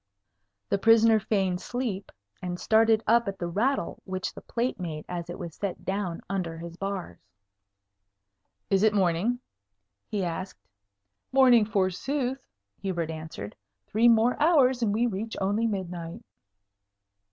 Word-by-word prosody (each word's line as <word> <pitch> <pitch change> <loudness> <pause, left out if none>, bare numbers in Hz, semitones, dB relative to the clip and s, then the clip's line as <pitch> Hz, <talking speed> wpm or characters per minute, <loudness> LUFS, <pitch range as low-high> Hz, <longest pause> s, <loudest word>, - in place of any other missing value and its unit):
The 200 - +1
prisoner 225 0 +6
feigned 195 -4 0
sleep, 235 -6 -3 0.3
and 180 -1 -4
started 225 0 +4
up 235 0 +4
at 195 -1 -3
the 175 - -3
rattle 215 +5 -1
which 185 0 -4
the - - -10
plate 240 -2 -2
made 160 -4 -5
as 175 -1 -5
it 175 - -5
was 170 -4 -7
set 200 -3 -4
down 190 -3 -2
under 180 -4 -3
his 170 0 -8
bars. 195 - -5 1.5
"Is 195 -1 +4
it 215 0 +4
morning?" 190 +5 +2 0.7
he 205 -2 -2
asked. 170 - -5 0.6
"Morning, 250 -4 +6
forsooth!" 245 +7 -1 0.4
Hubert 170 -4 -2
answered. 155 -10 -7 0.3
"Three 225 +3 +3
more 235 +4 +4
hours, 270 -6 +4
and 220 -3 +2
we 225 +4 +2
reach 220 0 -3
only 205 +4 +1
midnight." 175 -5 -5
200 Hz, 135 wpm, -27 LUFS, 175-230 Hz, 1.5 s, prisoner